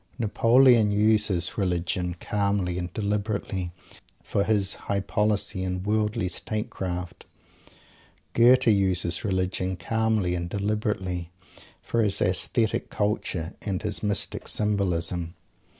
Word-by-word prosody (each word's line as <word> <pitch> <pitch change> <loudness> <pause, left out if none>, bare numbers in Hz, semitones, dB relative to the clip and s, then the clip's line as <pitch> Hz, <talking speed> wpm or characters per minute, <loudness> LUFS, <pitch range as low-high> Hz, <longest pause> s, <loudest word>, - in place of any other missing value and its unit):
Napoleon 115 0 +4
uses 105 -3 +1
"Religion" 90 -1 -1
calmly 100 -3 0
and 90 0 -5
deliberately 100 -3 -2 0.5
for 100 - 0
his 100 -2 +2 0.2
High 100 0 +1
Policy 105 -1 0
and 90 0 -3
Worldly 105 -1 0
Statecraft. 90 -3 -4 1.1
Goethe 125 +2 +5
uses 95 -5 +1
"Religion" 95 -2 -1
calmly 110 -5 0
and 85 0 -3
deliberately 100 -4 -2 0.5
for 115 - 0
his 105 -3 +1
aesthetic 100 +4 +1
culture 95 -5 -2
and 95 -2 -3
his 105 -1 0
mystic 105 -2 0
symbolism. 90 -4 0
100 Hz, 105 wpm, -26 LUFS, 90-105 Hz, 1.1 s, Goethe